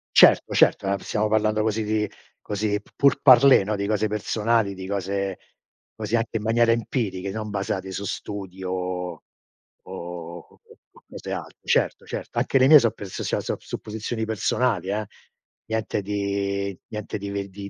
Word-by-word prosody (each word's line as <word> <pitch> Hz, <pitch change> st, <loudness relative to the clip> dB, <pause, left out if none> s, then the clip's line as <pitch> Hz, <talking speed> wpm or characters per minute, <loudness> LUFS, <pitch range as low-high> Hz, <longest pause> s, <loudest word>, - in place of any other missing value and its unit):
Certo, -, -, +6 dB
certo, 95 Hz, -, +4 dB
no, 100 Hz, 0 st, +1 dB
stiamo 105 Hz, +2 st, -1 dB
parlando 110 Hz, 0 st, +2 dB
così 110 Hz, 0 st, 0 dB
di 105 Hz, 0 st, 0 dB, 0.3 s
così 105 Hz, 0 st, -1 dB
p -, -, -24 dB
pourparlers, 135 Hz, -4 st, +6 dB
no, 105 Hz, 0 st, -1 dB
di 100 Hz, 0 st, -2 dB
cose 110 Hz, 0 st, +1 dB
personali, 105 Hz, 0 st, 0 dB
di 95 Hz, 0 st, -8 dB
cose 100 Hz, -1 st, -2 dB, 0.6 s
così 115 Hz, -, -2 dB
anche 115 Hz, 0 st, 0 dB
in 105 Hz, -, -6 dB
maniera 115 Hz, +1 st, +3 dB
empiriche, 105 Hz, -5 st, -1 dB
non 110 Hz, 0 st, -4 dB
basate 95 Hz, -1 st, -3 dB
su 100 Hz, -, -4 dB
studi 95 Hz, -3 st, -6 dB
o 90 Hz, -1 st, -3 dB
o -, -, -30 dB, 0.6 s
o 85 Hz, -2 st, -7 dB
o -, -, -23 dB, 0.3 s
o -, -, -21 dB
cose -, -, -8 dB
alte. -, -, -7 dB
Certo, -, -, +1 dB
certo, -, -, -7 dB
anche -, -, +2 dB
le 130 Hz, 0 st, +5 dB
mie 150 Hz, -1 st, +10 dB
so' 115 Hz, -3 st, +2 dB
perso 100 Hz, -2 st, -7 dB
sia -, -, 0 dB
sop -, -, -3 dB
supposizioni 110 Hz, +1 st, -4 dB
personali, 110 Hz, 0 st, 0 dB
eh. 105 Hz, +2 st, -1 dB, 0.6 s
Niente 110 Hz, -2 st, -1 dB
di 100 Hz, -1 st, -2 dB
niente 105 Hz, -2 st, -5 dB
ve 100 Hz, 0 st, -5 dB, 0.2 s
di 100 Hz, +1 st, -8 dB
105 Hz, 165 wpm, -24 LUFS, 95-110 Hz, 0.6 s, mie